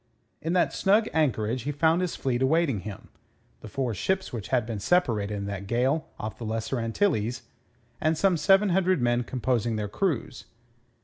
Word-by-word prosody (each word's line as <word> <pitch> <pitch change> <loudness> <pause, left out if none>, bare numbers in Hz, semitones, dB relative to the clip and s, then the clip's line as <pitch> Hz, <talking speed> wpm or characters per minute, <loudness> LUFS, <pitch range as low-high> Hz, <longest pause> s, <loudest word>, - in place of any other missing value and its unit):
In 165 +2 -2
that 180 - +2
snug 210 +3 +3
anchorage 125 -6 +1
he 145 +6 -3
found 160 +4 +2
his 180 -2 -2
fleet 125 -2 -1
awaiting 140 -3 +2
him 100 +1 -9 0.5
the - - -10
four 125 +2 -2
ships 190 - -1
which 110 -4 -5
had 125 -4 +1
been 110 -2 -4
separated 105 - +1
in 100 -1 -4
that 100 -1 -5
gale 130 +8 +1
off 110 0 -6
the - - -6
Lesser 115 +3 -2
Antilles, 120 - 0 0.6
and 155 0 +2
some 190 +1 +3
seven 195 +6 +4
hundred 185 -1 +2
men 120 0 +1
composing 120 -2 -1
their 105 -1 -2
crews. 140 - -2
130 Hz, 175 wpm, -27 LUFS, 110-165 Hz, 0.6 s, seven